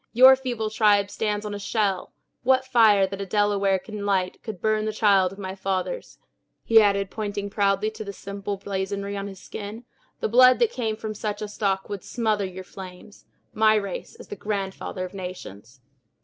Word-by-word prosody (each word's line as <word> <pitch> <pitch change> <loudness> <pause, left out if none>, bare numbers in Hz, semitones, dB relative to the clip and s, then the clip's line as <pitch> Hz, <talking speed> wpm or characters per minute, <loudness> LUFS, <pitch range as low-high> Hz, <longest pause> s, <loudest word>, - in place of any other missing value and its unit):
Your 260 +3 +9
feeble 240 -5 -3
tribe 205 -2 +3
stands 210 -1 -2
on 210 - -4
my 205 - -5
shell! 200 -2 -1 0.3
What 260 +1 +3
fire 220 -6 +5
that 195 +1 -6
a - - -3
Delaware 200 -1 +2
can 210 +2 -7
light 190 -2 0
would 210 -5 -5
burn 215 +1 +1
the 215 - -1
child 200 -4 +3
of 195 - -11
my 190 -2 -5
fathers," 195 - -3 0.5
he 225 -1 +6
added, 200 -2 +1
pointing 205 -2 -4
proudly 200 +1 +1
to 215 0 -7
the 200 - -6
simple 200 0 -5
blazonry 200 +1 -3
on 200 0 -4
his 195 -2 -9
skin; 215 +5 -8 0.3
"the - - 0
blood 255 +3 +7
that 470 -1 +2
came 225 - -2
from 215 0 -5
such 210 0 -4
a - - -3
stock 195 -2 -1
would 200 -3 -6
smother 215 -4 0
your 185 0 -7
flames! 185 +2 -12 0.3
My 215 0 +4
race 200 -3 -3
is - - -13
the - - -5
grandfather 195 -2 -4
of 180 - -10
nations!" 135 - -9
205 Hz, 190 wpm, -25 LUFS, 195-215 Hz, 0.5 s, Your